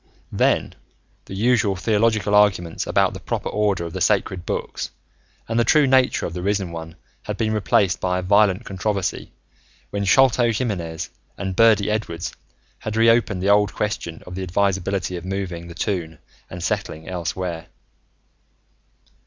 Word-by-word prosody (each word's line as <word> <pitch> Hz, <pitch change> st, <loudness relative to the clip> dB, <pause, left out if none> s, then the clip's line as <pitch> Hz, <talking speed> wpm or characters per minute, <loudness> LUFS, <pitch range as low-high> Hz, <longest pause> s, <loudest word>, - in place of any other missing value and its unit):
Then, -, -, +1 dB, 0.5 s
the 95 Hz, -, -8 dB
usual 110 Hz, -2 st, +2 dB
theological 105 Hz, 0 st, +1 dB
arguments 95 Hz, -5 st, +2 dB
about -, -, +2 dB
the -, -, -7 dB
proper -, -, -3 dB
order 100 Hz, -5 st, 0 dB
of 85 Hz, -, -7 dB
the -, -, -4 dB
Sacred 90 Hz, -3 st, +1 dB
Books -, -, -3 dB, 0.6 s
and 115 Hz, +1 st, 0 dB
the -, -, +5 dB
true 150 Hz, +3 st, +4 dB
nature 130 Hz, -1 st, +3 dB
of 85 Hz, -, -4 dB
the 90 Hz, -, -4 dB
Risen 100 Hz, -2 st, -1 dB
One 80 Hz, 0 st, -7 dB, 0.3 s
had -, -, -5 dB
been 110 Hz, -2 st, 0 dB
replaced 100 Hz, -3 st, +2 dB
by 90 Hz, 0 st, 0 dB
a 90 Hz, -, -2 dB
violent 100 Hz, +2 st, +3 dB
controversy 100 Hz, 0 st, -2 dB, 0.6 s
when 100 Hz, 0 st, -2 dB
Sholto 125 Hz, +1 st, +4 dB
Jiminez 95 Hz, -9 st, -3 dB, 0.3 s
and 95 Hz, -1 st, -3 dB
Birdy 110 Hz, -2 st, +4 dB
Edwards 85 Hz, -6 st, -3 dB, 0.5 s
had 110 Hz, -, -5 dB
reopened 115 Hz, -4 st, +3 dB
the 100 Hz, -, +2 dB
old 105 Hz, -2 st, +3 dB
question 85 Hz, -6 st, -3 dB
of 90 Hz, -, -9 dB
the 95 Hz, -, -4 dB
advisability 95 Hz, -1 st, 0 dB
of 85 Hz, -, -8 dB
moving 90 Hz, -3 st, -4 dB
the 85 Hz, -, -10 dB
Toon 85 Hz, -5 st, -2 dB, 0.3 s
and 90 Hz, -1 st, -7 dB
settling 90 Hz, -6 st, -3 dB
elsewhere. 90 Hz, -2 st, -4 dB
95 Hz, 155 wpm, -22 LUFS, 90-105 Hz, 0.6 s, the